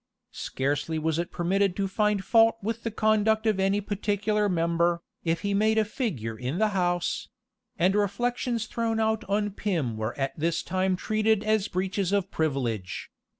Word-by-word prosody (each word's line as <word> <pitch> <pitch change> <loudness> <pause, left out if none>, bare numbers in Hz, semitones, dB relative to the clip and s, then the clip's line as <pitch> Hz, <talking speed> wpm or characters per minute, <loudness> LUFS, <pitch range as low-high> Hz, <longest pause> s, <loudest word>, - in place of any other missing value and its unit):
Scarcely 145 +4 -2
was 160 +1 0
it 170 - -2
permitted 190 +2 +1
to 200 -1 0
find 205 0 0
fault 225 +2 +5
with 225 +2 -2
the 230 - -2
conduct 220 0 +2
of 215 -3 +2
any 195 +1 +2
particular 205 +1 0
member, 170 0 +1 0.2
if 165 0 0
he 200 0 -1
made 215 +2 +3
a 220 - +4
figure 165 - -3
in 125 +7 -3
the 215 +1 +3
house; 175 -3 -1 0.5
and 180 +3 +3
reflections 230 +3 0
thrown 225 -2 -1
out 220 0 +1
on 205 +1 0
Pym 165 - -2
were 110 +2 -3
at 135 -1 -1
this 165 +1 -1
time 185 +1 0
treated 215 +2 +1
as 215 -2 +1
breaches 190 +1 -1
of 200 -1 0
privilege. 125 -11 -2
195 Hz, 165 wpm, -27 LUFS, 170-215 Hz, 0.5 s, fault